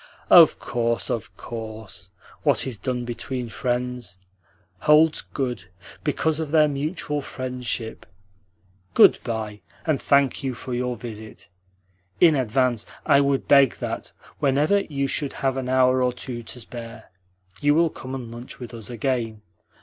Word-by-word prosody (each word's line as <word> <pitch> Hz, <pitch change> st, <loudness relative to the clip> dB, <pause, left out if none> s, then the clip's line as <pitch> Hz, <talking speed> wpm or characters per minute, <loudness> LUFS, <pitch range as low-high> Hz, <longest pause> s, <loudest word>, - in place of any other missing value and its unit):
"Of -, -, +9 dB
course, 115 Hz, -1 st, -1 dB
of 115 Hz, -, -4 dB
course. 110 Hz, -6 st, -8 dB, 0.3 s
What -, -, +2 dB
is 130 Hz, -3 st, -4 dB
done 125 Hz, -2 st, -2 dB
between 120 Hz, 0 st, -4 dB
friends 125 Hz, -4 st, -2 dB, 0.6 s
holds 150 Hz, -, +5 dB
good 125 Hz, -, -4 dB, 0.4 s
because 160 Hz, -1 st, 0 dB
of 160 Hz, -2 st, -3 dB
their 155 Hz, 0 st, +5 dB
mutual 150 Hz, +1 st, -2 dB
friendship. 125 Hz, -4 st, -4 dB, 0.9 s
Good -, -, +7 dB
bye, 110 Hz, -3 st, -4 dB, 0.2 s
and 155 Hz, -4 st, +1 dB
thank 140 Hz, -2 st, +3 dB
you 130 Hz, -2 st, -2 dB
for 125 Hz, +1 st, -6 dB
your 125 Hz, 0 st, -1 dB
visit. 110 Hz, -1 st, -10 dB, 0.7 s
In 165 Hz, -2 st, +7 dB
advance 125 Hz, -2 st, +1 dB, 0.2 s
I 140 Hz, -, +5 dB
would 140 Hz, -1 st, 0 dB
beg 140 Hz, -3 st, +6 dB
that, -, -, -5 dB, 0.3 s
whenever 145 Hz, +8 st, +3 dB
you 140 Hz, -7 st, -2 dB
should 140 Hz, +1 st, -1 dB
have 135 Hz, -1 st, -1 dB
an 130 Hz, -1 st, -3 dB
hour 130 Hz, 0 st, +4 dB
or 125 Hz, -1 st, +2 dB
two 125 Hz, -1 st, -6 dB
to 120 Hz, +2 st, -8 dB
spare, 115 Hz, 0 st, -9 dB, 0.5 s
you 145 Hz, 0 st, +3 dB
will 165 Hz, 0 st, +3 dB
come 130 Hz, +1 st, -7 dB
and 120 Hz, -3 st, -7 dB
lunch 120 Hz, +2 st, -9 dB
with 120 Hz, -1 st, -8 dB
us 115 Hz, -2 st, -8 dB
again. 115 Hz, -3 st, -2 dB
125 Hz, 145 wpm, -24 LUFS, 115-140 Hz, 0.9 s, Of